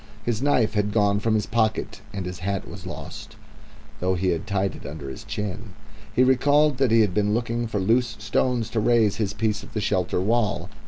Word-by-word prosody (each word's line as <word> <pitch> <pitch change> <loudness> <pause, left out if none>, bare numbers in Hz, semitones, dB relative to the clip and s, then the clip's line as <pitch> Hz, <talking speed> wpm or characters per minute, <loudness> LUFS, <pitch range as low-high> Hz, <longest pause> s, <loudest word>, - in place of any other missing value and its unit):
His 120 -2 -1
knife 125 -6 +2
had 105 -1 0
gone 100 -2 +3
from 110 +1 +1
his 105 - +1
pocket 110 -1 -1
and 100 -3 -4
his 90 0 -6
hat 100 +1 -3
was 90 +1 -9
lost, 90 - -8 0.6
though 95 +1 +1
he 90 +1 0
had 85 +2 -2
tied 100 -2 0
it - - -11
under 70 -2 -7
his 65 - -9
chin. 105 0 -5 0.4
He 125 +3 +3
recalled 145 +2 +4
that 135 -2 +3
he 115 0 +5
had 105 -4 +2
been 105 +1 +1
looking 120 0 -1
for 110 -2 -2
loose 115 +4 +2
stones 115 +2 0
to 115 - 0
raise 110 -2 +3
his 100 -3 -1
piece 105 0 -1
of 100 - -13
the - - +1
shelter 90 -3 0
wall. 105 +2 0
105 Hz, 210 wpm, -24 LUFS, 95-115 Hz, 0.6 s, he